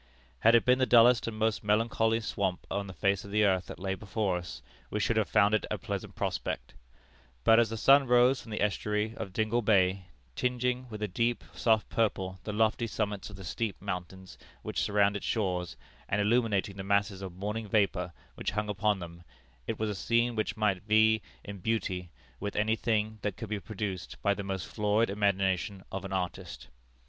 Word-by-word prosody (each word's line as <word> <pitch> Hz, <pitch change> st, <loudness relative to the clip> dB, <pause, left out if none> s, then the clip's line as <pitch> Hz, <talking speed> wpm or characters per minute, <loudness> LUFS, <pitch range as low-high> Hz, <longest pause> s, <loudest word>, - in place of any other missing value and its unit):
Had 115 Hz, -, +6 dB
it 115 Hz, -, +4 dB
been 125 Hz, +1 st, +4 dB
the 130 Hz, -, +2 dB
dullest 120 Hz, 0 st, +6 dB
and 110 Hz, -1 st, -4 dB
most 110 Hz, 0 st, 0 dB
melancholy 110 Hz, +1 st, +2 dB
swamp 100 Hz, -4 st, -2 dB
on 100 Hz, 0 st, -2 dB
the -, -, -7 dB
face 100 Hz, -1 st, +1 dB
of 100 Hz, -, -10 dB
the 105 Hz, +1 st, +2 dB
earth 95 Hz, -2 st, +1 dB
that -, -, -8 dB
lay 95 Hz, +1 st, -2 dB
before 100 Hz, -1 st, -2 dB
us, 90 Hz, 0 st, -8 dB, 0.3 s
we -, -, -2 dB
should -, -, +1 dB
have -, -, +1 dB
found 100 Hz, +2 st, +4 dB
it 110 Hz, -, +1 dB
a -, -, -1 dB
pleasant -, -, -5 dB
prospect; -, -, -3 dB, 0.7 s
but, 115 Hz, -, +6 dB
as 115 Hz, -2 st, +3 dB
the 115 Hz, -, -4 dB
sun 135 Hz, +4 st, +6 dB
rose 125 Hz, +2 st, +4 dB
from -, -, -13 dB
the 105 Hz, -1 st, -1 dB
estuary 105 Hz, +1 st, -1 dB
of 95 Hz, -, -5 dB
Dingle 110 Hz, +4 st, 0 dB
Bay, 95 Hz, -3 st, +2 dB, 0.3 s
tinging 125 Hz, 0 st, -1 dB
with 105 Hz, -1 st, -6 dB
a -, -, 0 dB
deep, 115 Hz, +5 st, 0 dB
soft 110 Hz, -2 st, +2 dB
purple 95 Hz, -4 st, -1 dB
the 105 Hz, -, -3 dB
lofty 110 Hz, +2 st, +1 dB
summits 105 Hz, -2 st, -3 dB
of 100 Hz, -, -10 dB
the 95 Hz, -, -10 dB
steep 100 Hz, +3 st, -3 dB
mountains 95 Hz, -1 st, -6 dB, 0.2 s
which -, -, -2 dB
surround 100 Hz, 0 st, +2 dB
its 100 Hz, -, -4 dB
shores, 90 Hz, -6 st, -1 dB, 0.3 s
and 105 Hz, -, +1 dB
illuminating 105 Hz, -2 st, +1 dB
the 95 Hz, -, -5 dB
masses 100 Hz, 0 st, +1 dB
of 95 Hz, -3 st, -7 dB
morning 105 Hz, +3 st, -4 dB
vapor 95 Hz, -4 st, +1 dB, 0.2 s
which -, -, -3 dB
hung 105 Hz, 0 st, -2 dB
upon 105 Hz, +1 st, +1 dB
them, 85 Hz, -1 st, -9 dB, 0.5 s
it 115 Hz, -, -2 dB
was 110 Hz, -, -1 dB
a -, -, -2 dB
scene 115 Hz, +4 st, +1 dB
which 110 Hz, +1 st, -2 dB
might 100 Hz, -4 st, +1 dB
vie 110 Hz, 0 st, +4 dB, 0.2 s
in 100 Hz, -1 st, -8 dB
beauty 95 Hz, -4 st, -2 dB, 0.3 s
with 105 Hz, 0 st, -4 dB
any 110 Hz, +2 st, +2 dB
thing 110 Hz, -1 st, -1 dB
that 100 Hz, -3 st, -3 dB
could 115 Hz, -, -6 dB
be 105 Hz, -1 st, -2 dB
produced 100 Hz, -4 st, -5 dB
by 100 Hz, -, +3 dB
the 100 Hz, -, -5 dB
most 95 Hz, -2 st, -4 dB
florid 105 Hz, 0 st, +1 dB
imagination 100 Hz, -1 st, 0 dB
of 95 Hz, 0 st, -4 dB
an 95 Hz, -, -6 dB
artist. 90 Hz, -2 st, -4 dB
105 Hz, 200 wpm, -30 LUFS, 95-110 Hz, 0.7 s, Had